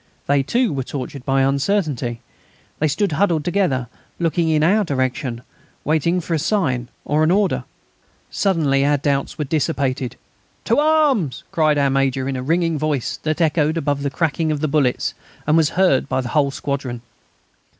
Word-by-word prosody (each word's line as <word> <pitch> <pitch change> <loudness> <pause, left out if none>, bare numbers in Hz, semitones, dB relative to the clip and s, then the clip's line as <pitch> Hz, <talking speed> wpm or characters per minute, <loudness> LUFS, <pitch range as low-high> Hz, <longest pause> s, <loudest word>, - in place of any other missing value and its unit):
They, 140 0 +3
too, 235 - +1
were 135 - -1
tortured 135 0 -6
by 135 -1 +2
uncertainty. 140 - 0 0.6
They 155 - +2
stood 170 +6 0
huddled 160 -1 +1
together, 175 -10 0 0.3
looking 165 -1 0
in 155 -1 +2
our 205 +6 +4
direction, 130 -5 -2 0.4
waiting 160 +4 +1
for 170 0 -4
a 160 - +1
sign 145 - 0 0.2
or 150 +2 +2
an 155 - +3
order. 195 +1 +1 0.7
Suddenly 155 -8 +1
our 145 +1 +3
doubts 140 0 -1
were 150 - -2
dissipated. 135 -4 -1 0.5
"To 230 - +3
arms!" 295 - +2
cried 155 -2 +2
our 140 -1 +2
Major, 135 -1 0
in 135 - -2
a 130 - -3
ringing 165 +2 0
voice 150 -4 -1
that 155 +2 -2
echoed 155 0 +2
above 145 -3 -1
the 140 - -1
crackling 160 +2 0
of 150 - -1
the 155 - 0
bullets 140 -4 +1 0.3
and 150 - +3
was 160 -2 +4
heard 185 -9 +3
by 130 - 0
the 125 - -5
whole 145 0 +2
squadron. 135 -4 -4
150 Hz, 170 wpm, -20 LUFS, 135-165 Hz, 0.7 s, our